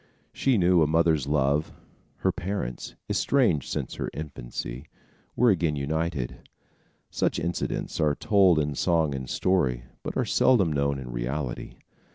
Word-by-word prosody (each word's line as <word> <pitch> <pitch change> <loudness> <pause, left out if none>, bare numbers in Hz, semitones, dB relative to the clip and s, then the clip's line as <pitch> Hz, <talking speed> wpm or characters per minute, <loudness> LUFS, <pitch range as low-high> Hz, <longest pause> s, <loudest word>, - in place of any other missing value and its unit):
She 130 -4 +2
knew 90 -2 +4
a 75 - +4
mother's 80 -3 +2
love. 70 +1 +1 0.5
Her - - +2
parents, 90 -10 -4
estranged 115 - +2
since - - -3
her - - -4
infancy, 70 -2 -6 0.5
were 120 -1 +5
again 85 -5 +1
united. 75 -2 -3 0.6
Such - - 0
incidents 85 +1 -3
are 75 -2 +2
told 95 -5 +4
in 75 -1 0
song 80 -1 +1
and 65 -2 -5
story, 65 -11 +1 0.2
but - - -5
are - - +1
seldom 100 -11 +3
known 70 -1 0
in 65 -2 -7
reality. - - -4
75 Hz, 140 wpm, -26 LUFS, 70-85 Hz, 0.6 s, were